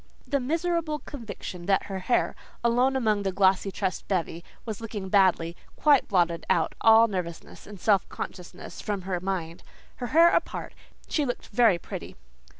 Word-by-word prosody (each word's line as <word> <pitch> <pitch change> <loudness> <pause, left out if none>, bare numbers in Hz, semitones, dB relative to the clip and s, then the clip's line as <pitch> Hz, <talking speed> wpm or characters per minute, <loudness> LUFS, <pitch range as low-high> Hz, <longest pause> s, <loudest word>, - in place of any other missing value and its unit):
The 280 - 0
miserable 325 +3 -1
conviction 200 -10 -8
that 195 -1 +3
her 195 -2 -5
hair, 215 +7 +1 0.3
alone 245 +3 +3
among 215 -5 +1
that 195 -2 -2
glossy 195 0 +3
tressed 190 -2 -3
bevy, 170 -3 -2 0.2
was 220 -2 -5
looking 210 -4 -5
badly, 185 -4 +3 0.2
quite 290 -3 +4
blotted 170 -3 +1
out 170 -4 +2
all 225 +1 +7
nervousness 180 -5 -6
and 205 -2 -10
self 200 -2 +2
consciousness 180 -2 -8
from 205 -3 -3
her 185 -1 -2
mind. 175 -3 -4 0.4
Her 245 - -4
hair 335 +6 +6
apart, - - -2 0.3
she 300 - 0
looked 245 -3 -4
very 225 -4 +4
pretty. - - -8
200 Hz, 155 wpm, -27 LUFS, 185-245 Hz, 0.4 s, all